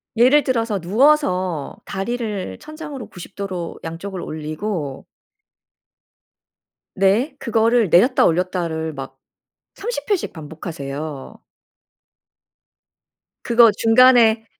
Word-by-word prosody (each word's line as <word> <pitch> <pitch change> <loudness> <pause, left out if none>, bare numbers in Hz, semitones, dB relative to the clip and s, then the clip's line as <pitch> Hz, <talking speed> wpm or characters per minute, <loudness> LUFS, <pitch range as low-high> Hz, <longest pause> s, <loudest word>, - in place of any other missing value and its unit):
예를 260 +6 +5
들어서 230 -5 -1
누워서 185 - +1
다리를 210 -1 -4
천장으로 300 -6 -8
90 185 -1 -12
도로 185 -4 -5
양쪽을 175 +3 -6
올리고 155 -1 -5 1.9
네. 200 +9 +2
그거를 230 -2 +2
내렸다 240 - +4
올렸다를 165 -2 -1
막 135 -1 -8 0.6
30 470 +4 -5
회씩 400 -4 0
반복하세요. 150 -3 -7 2.0
그거 235 -1 +6
중간에 225 0 +5
200 Hz, 195 characters per minute, -20 LUFS, 165-240 Hz, 2.0 s, 그거